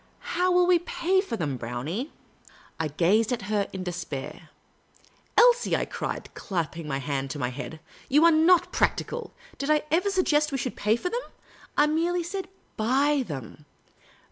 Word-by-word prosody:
" - - -35 0.2
How 365 +1 +3
can 360 0 +5
we 360 -1 +5
pay 365 +2 +1
for 310 - -4
them, 145 -8 -2
Brownie? 140 - -4 0.3
" - - -25
I 160 - 0
gazed 190 - +2
at 240 -4 -2
her 205 0 0
in 190 -1 -5
despair. 170 -6 -6 0.4
" - - -32
Elsie," 485 0 +5
I - - 0
cried, - - -5
clapping 165 -4 -4
my 135 -2 -1
hand 135 0 -3
to 135 - -5
my 125 -3 -1
head, 155 +5 -7 0.2
" - - -23
you 295 +5 +5
are 335 - +7
not 330 +3 +4
practical. 485 0 -1 0.3
Did 280 - -2
I 305 -1 +3
ever 360 +5 +3
sug 375 -2 +1
gest 300 0 +2
we 275 - -1
should 255 -1 -3
pay 210 +2 +2
for 360 +10 -3
them? 485 - -1 0.6
I 295 - +6
said - - 0
merely, 345 +2 0 0.5
buy 270 +5 +2
them. 145 +1 -8
240 Hz, 190 wpm, -26 LUFS, -, 0.6 s, are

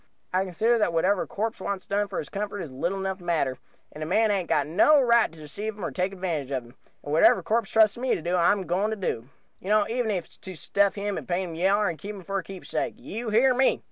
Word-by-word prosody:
I 185 +1 +2
consider 225 +6 +1
that 210 -5 +1
whatever 185 +4 +2
a - - -4
corpse 220 0 -3
wants 190 -1 -3
done 205 +1 0
for 195 - -6
his 150 - -3
comfort 205 0 -4
is 155 - -7
little 175 +9 -2
enough 190 -1 -3
matter, 160 -7 -1 0.3
and 150 - -10
a 155 - -3
man 215 +5 +3
hain't 190 -5 -1
got - - +2
no 210 - +5
right 235 - +4
to 165 - -16
deceive 205 +9 -6
him 205 - -4
or - - -3
take 185 +1 -1
advantage 170 -8 -3
of 130 -3 -2
him; 120 +2 -17 0.3
and 145 - -4
whatever 165 +4 +5
a - - -21
corpse 220 +1 0
trusts 220 0 +4
me 255 0 +1
to - - -5
do 175 +1 0
I'm 180 +3 +3
a - - -6
going 190 +5 0
to 220 - -2
do, 130 - -3 0.3
you 190 - -8
know, 210 -1 +4
even 235 0 -1
if 185 -5 -1
it's - - -20
to 190 -1 -9
stuff 200 +6 +1
him 205 0 -2
and - - -12
paint 180 0 -1
him - - -7
yaller 195 +4 +2
and 165 -2 -3
keep 205 +1 -6
him 195 - -10
for 195 +3 -2
a - - -7
keepsake 190 0 -4
you 225 +2 -5
hear 245 +5 +4
me!" 260 +1 +2
195 Hz, 275 wpm, -26 LUFS, 175-215 Hz, 0.3 s, no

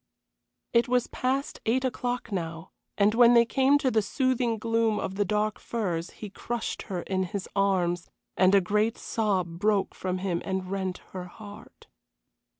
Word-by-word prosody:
It 235 +2 +4
was 250 0 +2
past 270 +3 -2
eight 255 +4 +2
o'clock 245 -2 -2
now, 165 -2 -4 0.3
and 205 +1 +4
when 240 +1 +6
they 235 0 +7
came 270 +4 +3
to 270 -3 0
the 220 - +3
soothing 245 +2 0
gloom 225 0 +1
of 190 - -3
the 205 +1 +1
dark 210 +2 0
firs 180 -7 -2
he 210 -3 -9
crushed 240 +3 -4
her 180 -3 -3
in 190 -1 -1
his 190 +1 -3
arms, 180 -3 +1 0.3
and 185 +2 +5
a 195 - +6
great 210 +4 +1
sob 185 -6 -1
broke 205 -1 +1
from 185 0 -3
him 180 -2 -2
and 190 -1 -3
rent 190 -2 -3
her 185 -1 -6
heart. 205 +3 -13
205 Hz, 165 wpm, -27 LUFS, 185-235 Hz, 0.3 s, they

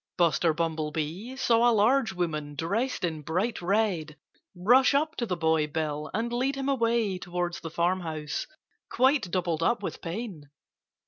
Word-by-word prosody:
Buster 170 -1 +3
Bumblebee 160 - -3
saw 240 -2 +3
a 230 - +3
large 225 +1 +3
woman 155 -5 -3
dressed 205 - -1
in 160 -3 -2
bright 180 +10 -1
red 175 -5 0 0.4
rush 245 +10 +4
up 310 +3 +1
to 235 - -1
the 180 -3 -2
boy 160 -2 +2
Bill 150 0 -3
and 230 +3 -2
lead 260 +3 0
him 275 0 -2
away 230 -7 +1
towards 175 -1 -3
the 165 - -6
farmhouse, 165 -3 -2 0.4
quite 260 -5 +2
doubled 170 -3 -1
up 230 +8 +1
with - - -5
pain. 170 - -6
180 Hz, 150 wpm, -28 LUFS, 160-235 Hz, 0.4 s, rush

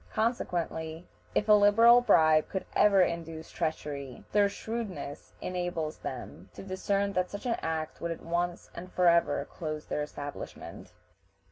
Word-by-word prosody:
Consequently, 175 -7 -2 0.3
if 210 - +1
a 210 - +7
liberal 225 +4 +7
bribe 155 -9 +4
could 190 - -3
ever 200 -3 +6
induce 165 -2 -4
treachery, 145 -5 -4
their 205 -1 +4
shrewdness 200 -9 -6
enables 175 -4 -3
them 100 -7 -7
to - - -8
discern 195 +1 -1
that 180 -1 0
such 205 - -7
an 235 -2 0
act 160 -1 -3
would 170 - -2
at 165 - -5
once 175 +1 -2
and 180 +2 -9
forever 170 -2 +3
close 155 -2 -5
their 150 - -2
establishments. 145 -1 -7
175 Hz, 140 wpm, -29 LUFS, 160-200 Hz, 0.3 s, a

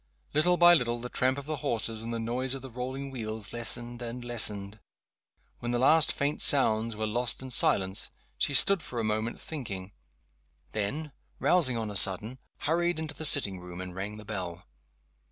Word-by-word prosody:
Little 175 +4 +3
by 175 0 +8
little, 120 -6 +1
the 125 +1 -7
tramp 130 +2 0
of 140 - -7
the 155 0 -4
horses 115 -3 -2
and 115 +1 -5
the 115 - -2
noise 125 +3 -2
of 135 - -9
the 130 - -9
rolling 130 +3 -5
wheels 110 -4 -5
lessened 120 +1 -1
and 120 +1 -6
lessened. 105 -3 -1 0.8
When 120 - -5
the 120 - 0
last 155 +5 +5
faint 145 +1 -1
sounds 115 -5 +5
were 110 +1 -3
lost 120 +4 -1
in 130 - -7
silence 95 -4 +1 0.3
she 140 - 0
stood 195 +7 +6
for 120 - -6
a - - -1
moment 110 +2 -2
thinking 100 - -6 0.8
then, 140 +9 -3 0.3
rousing 145 -9 +2
on 110 -2 -3
a - - -8
sudden, 105 +7 +3 0.2
hurried 175 +2 0
into 160 -1 -5
the 155 +1 -4
sitting 100 -11 +5
room, 90 0 -10
and 90 -1 -7
rang 100 +3 -6
the 105 - -11
bell. 90 -4 -6
120 Hz, 185 wpm, -28 LUFS, 110-135 Hz, 0.8 s, by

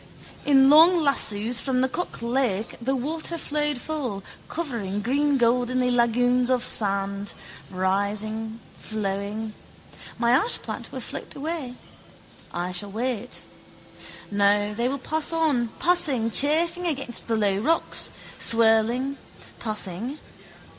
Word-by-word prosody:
In 270 -2 +6
long 325 +5 +7
lassoes 240 -6 +2
from 260 -2 0
the 260 - +2
Cock 310 -2 -4
lake 235 -4 -1
the 265 +3 0
water 315 +6 -2
flowed 295 -2 -1
full, 250 -10 -4 0.3
covering 235 - -3
greengoldenly 250 -2 +1
lagoons 245 +1 +2
of 250 -1 +2
sand, 200 -2 0 0.4
rising, 205 +4 -2 0.2
flowing. 210 +1 -4 0.6
My 235 -1 +2
ashplant 350 - -1
will - - -6
float - - -7
away. 290 -4 -4 0.8
I 175 +1 -3
shall 180 +3 -2
wait. 240 +2 -4 0.9
No, 205 +1 +2
they 235 +4 -1
will 275 - -2
pass 310 +4 -2
on, 305 -8 +1
passing, 285 -10 +2
chafing 335 +7 +3
against 275 -6 +1
the 230 - +1
low 200 -2 +1
rocks, 325 +10 +1 0.3
swirling, 230 +4 +3 0.4
passing. 215 - -3
245 Hz, 115 wpm, -24 LUFS, 210-280 Hz, 0.9 s, long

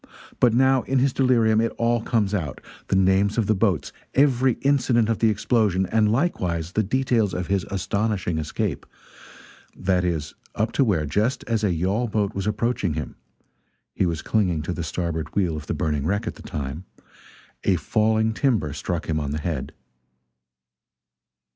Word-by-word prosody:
But 120 -2 +4
now 130 +1 +4
in 135 +2 -1
his 130 0 +2
delirium 115 -4 +3
it 115 - 0
all 120 0 +1
comes 110 -3 0
out: 80 -9 -2 0.3
the - - +1
names 95 +2 +3
of 115 - +2
the 110 - +3
boats, 95 -8 0 0.2
every 130 -2 +4
incident 125 -5 +2
of 115 - 0
the 115 - +4
explosion, 105 -3 +1
and 105 +2 +2
likewise 90 - -1
the 110 - +1
details 115 -2 +1
of 90 - -2
his 100 -1 0
astonishing 100 -3 -1
escape 75 -1 -3 0.9
that 90 -1 +1
is, 80 -4 -2 0.2
up 110 +2 0
to 140 - +2
where, 90 -11 +1
just 110 - 0
as 115 -2 -1
a 100 - +2
yawl 95 +8 0
boat 105 -2 -1
was 100 0 -3
approaching 105 -6 0
him 75 - -5 0.8
(he 95 - +1
was 80 -2 -3
clinging 90 -8 +1
to 90 - -3
the 85 - -4
starboard 80 0 -3
wheel 90 -5 +1
of 75 0 -7
the - - -2
burning 75 -2 -1
wreck 100 +5 0
at - - -3
the - - -14
time), 75 +4 -5 0.8
a 95 - +3
falling 110 +5 +1
timber 110 - 0
struck 85 +3 -3
him 80 -1 0
on 75 -2 -3
the 75 - -2
head. 80 -4 -3
100 Hz, 175 wpm, -24 LUFS, 85-115 Hz, 0.9 s, But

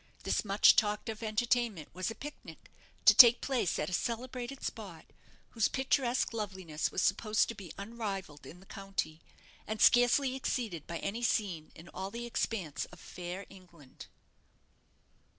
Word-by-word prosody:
This - - 0
much 200 -1 +5
talked 210 +1 +1
of 220 0 -6
entertainment 225 -5 0
was 185 +3 -3
a 225 - -6
pic 295 +1 -7
nic, - - -13 0.3
to - - +9
take 240 -1 +9
place 255 -9 -1
at 150 - -2
a 185 - -5
celebrated 245 +5 -4
spot, 190 -8 -7 0.5
whose 225 -3 +2
picturesque 260 -2 0
loveliness 190 -8 -3
was - - -1
supposed 215 +2 +2
to - - -3
be 195 -7 -10
unrivalled 200 -7 -6
in 180 - -12
the - - -17
county, 195 -5 -5 0.5
and 215 0 -4
scarcely 245 +4 +5
exceeded 225 - -3
by 170 - -4
any 200 +7 -4
scene 190 -9 -1
in 165 - -13
all 190 +1 -5
the 235 +3 -6
expanse 205 -9 -2
of 180 - -16
fair 180 +3 -7
England. 175 -8 -15
210 Hz, 155 wpm, -32 LUFS, 180-235 Hz, 0.5 s, to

